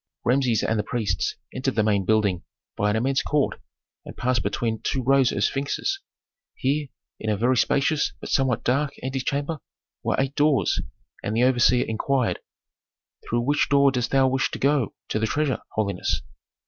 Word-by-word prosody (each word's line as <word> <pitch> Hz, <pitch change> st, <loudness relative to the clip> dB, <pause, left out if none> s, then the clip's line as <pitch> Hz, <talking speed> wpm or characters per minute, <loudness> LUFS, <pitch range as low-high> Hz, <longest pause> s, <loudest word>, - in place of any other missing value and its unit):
Rameses 125 Hz, -3 st, +2 dB
and 110 Hz, -1 st, +1 dB
the -, -, 0 dB
priests 105 Hz, -8 st, -1 dB, 0.2 s
entered 130 Hz, +1 st, -2 dB
the 110 Hz, -, +3 dB
main 100 Hz, -3 st, +1 dB
building 105 Hz, -5 st, +2 dB, 0.3 s
by 105 Hz, -, +1 dB
an 105 Hz, -, +1 dB
immense 130 Hz, +4 st, +1 dB
court 145 Hz, -2 st, 0 dB, 0.4 s
and -, -, -11 dB
passed 125 Hz, -1 st, +1 dB
between 110 Hz, +2 st, -2 dB
two 130 Hz, -, -1 dB
rows 135 Hz, 0 st, +4 dB
of -, -, -1 dB
sphinxes. 140 Hz, -, -1 dB, 0.6 s
Here 145 Hz, +2 st, 0 dB, 0.3 s
in 110 Hz, -, -3 dB
a 105 Hz, -, +1 dB
very 125 Hz, +5 st, +2 dB
spacious, 140 Hz, +5 st, +2 dB
but -, -, -7 dB
somewhat 130 Hz, -3 st, +1 dB
dark, 140 Hz, +3 st, +1 dB
antechamber 140 Hz, +4 st, -2 dB, 0.4 s
were -, -, 0 dB
eight 135 Hz, 0 st, 0 dB
doors, 145 Hz, -1 st, +2 dB, 0.4 s
and 105 Hz, -, -2 dB
the 120 Hz, -, +3 dB
overseer 125 Hz, -1 st, +4 dB
inquired, 125 Hz, +2 st, 0 dB, 0.9 s
"Through 120 Hz, 0 st, +1 dB
which 145 Hz, +4 st, +1 dB
door 140 Hz, -1 st, +5 dB
dost 125 Hz, -2 st, -1 dB
thou 135 Hz, -1 st, +4 dB
wish 130 Hz, 0 st, +1 dB
to -, -, -5 dB
go 140 Hz, -3 st, +1 dB
to 110 Hz, -, 0 dB
the 110 Hz, -, +1 dB
treasure, 145 Hz, +1 st, 0 dB
holiness?" 100 Hz, -4 st, -1 dB
130 Hz, 170 wpm, -24 LUFS, 110-140 Hz, 0.9 s, door